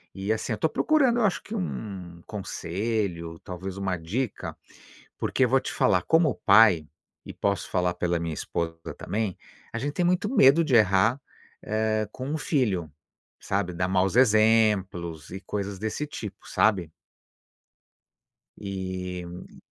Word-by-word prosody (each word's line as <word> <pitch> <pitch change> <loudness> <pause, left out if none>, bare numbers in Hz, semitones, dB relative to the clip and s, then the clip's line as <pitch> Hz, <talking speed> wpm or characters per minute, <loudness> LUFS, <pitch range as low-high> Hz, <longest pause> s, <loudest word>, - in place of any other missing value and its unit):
e, 100 +3 -1
assim, 110 - -3
eu 110 - -1
tô - - +2
procurando 265 - +2
eu 235 - +2
acho 195 - 0
que 215 - -8
um 95 - -5
conselho, 95 -3 -3
talvez 95 +1 -6
uma 95 -2 -1
dica, 85 -3 -4 0.6
porque 130 - +1
vou 130 +2 +3
te - - -5
falar 90 -2 +3
como 160 - +3
pai 100 -7 +5 0.4
e, - - -8
posso 100 -1 -1
falar 90 -1 +1
pela 85 -1 0
minha 85 -1 -3
esposa 80 +2 -3 0.2
também, 105 -3 -2 0.3
a 115 - -3
gente 145 +3 -2
tem 175 - 0
muito 180 +4 +2
medo 165 - +6
de 145 -5 +1
errar, 110 +4 +4 0.4
hã, 110 0 0
com 130 +4 -6
um 150 - -1
filho, 105 - 0 0.5
sabe, 95 -2 -2
dar 90 +1 -1
maus 95 +2 +1
exemplos 105 - +3
e 95 - -5
coisas 100 0 -4
desse 110 +8 -3
tipo, 105 -9 -8
sabe? 95 -7 +2 1.7
E 95 -2 -5
hum 85 +1 -11
100 Hz, 145 wpm, -26 LUFS, 90-120 Hz, 1.7 s, medo